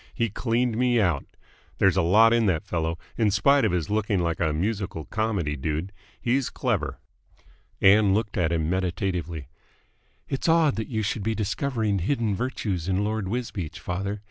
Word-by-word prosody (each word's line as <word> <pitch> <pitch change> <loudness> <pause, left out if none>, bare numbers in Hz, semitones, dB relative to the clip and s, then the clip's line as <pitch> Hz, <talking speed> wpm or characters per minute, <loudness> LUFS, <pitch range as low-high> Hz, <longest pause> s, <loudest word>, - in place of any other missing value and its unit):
He 115 -4 0
cleaned 115 +1 0
me 125 -1 +3
out. 85 -9 +1 0.5
There's 95 -2 +4
a 95 - +3
lot 110 +7 +5
in 115 -2 +3
that 80 -4 0
fellow, 80 -1 -2 0.2
in 110 -2 +4
spite 140 +7 +4
of - - +2
his 85 -3 -1
looking 105 -1 +1
like 85 -1 -1
a 80 -2 +1
musical 95 -1 -2
comedy 105 -9 -1
dude. 80 +6 -3 0.3
He's 125 +2 0
clever." - - -2 0.8
Ann 100 +1 +6
looked 110 -1 -2
at 85 -4 +1
him 80 -2 0
meditatively. 90 - -2 0.8
"It's 135 +4 -1
odd 160 -3 +4
that 110 - -3
you 110 -3 -2
should 105 +1 -2
be 110 +2 -1
discovering 110 -1 -1
hidden 110 +1 0
virtues 100 -7 -3
in 95 +1 +1
Lord 105 -2 -2
Wisbeach, 105 -7 -4
father. 100 +3 -3
100 Hz, 170 wpm, -25 LUFS, 90-115 Hz, 0.8 s, Ann